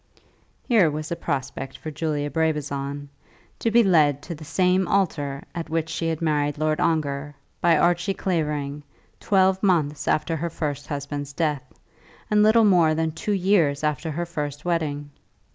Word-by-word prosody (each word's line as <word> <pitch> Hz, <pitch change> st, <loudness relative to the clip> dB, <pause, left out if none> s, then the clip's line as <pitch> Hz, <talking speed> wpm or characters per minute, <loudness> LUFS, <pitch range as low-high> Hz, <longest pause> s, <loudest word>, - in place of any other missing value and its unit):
Here 215 Hz, -, +5 dB
was 155 Hz, +2 st, -5 dB
a -, -, 0 dB
prospect 135 Hz, -4 st, -4 dB
for 155 Hz, -, -7 dB
Julia 145 Hz, -2 st, -2 dB
Brabazon; 145 Hz, -2 st, -2 dB, 0.5 s
to 230 Hz, -, +1 dB
be 235 Hz, +1 st, +5 dB
led 150 Hz, -7 st, +3 dB
to 175 Hz, -, -6 dB
the 155 Hz, -1 st, -10 dB
same 180 Hz, +3 st, +2 dB
altar, 145 Hz, -8 st, 0 dB
at 165 Hz, -2 st, -5 dB
which 165 Hz, 0 st, -1 dB
she 165 Hz, -, -2 dB
had 165 Hz, 0 st, -2 dB
married 145 Hz, -2 st, 0 dB
Lord 155 Hz, 0 st, 0 dB
Ongar, 145 Hz, -3 st, -1 dB, 0.3 s
by 170 Hz, -2 st, +4 dB
Archie 175 Hz, +3 st, +2 dB
Clavering, 150 Hz, -6 st, -2 dB, 0.4 s
twelve 190 Hz, -1 st, +2 dB
months 155 Hz, -7 st, +1 dB
after 155 Hz, +2 st, +1 dB
her 170 Hz, +3 st, -2 dB
first 145 Hz, -3 st, -4 dB
husband's 145 Hz, 0 st, -5 dB
death, 145 Hz, -4 st, -2 dB, 0.6 s
and 210 Hz, 0 st, +4 dB
little 220 Hz, +1 st, +5 dB
more 170 Hz, -6 st, +4 dB
than 160 Hz, 0 st, 0 dB
two 205 Hz, +6 st, -3 dB
years 180 Hz, -7 st, +2 dB
after 150 Hz, +2 st, -1 dB
her 170 Hz, +3 st, -2 dB
first 150 Hz, -3 st, -5 dB
wedding! 145 Hz, -4 st, -2 dB
155 Hz, 160 wpm, -24 LUFS, 145-175 Hz, 0.6 s, Here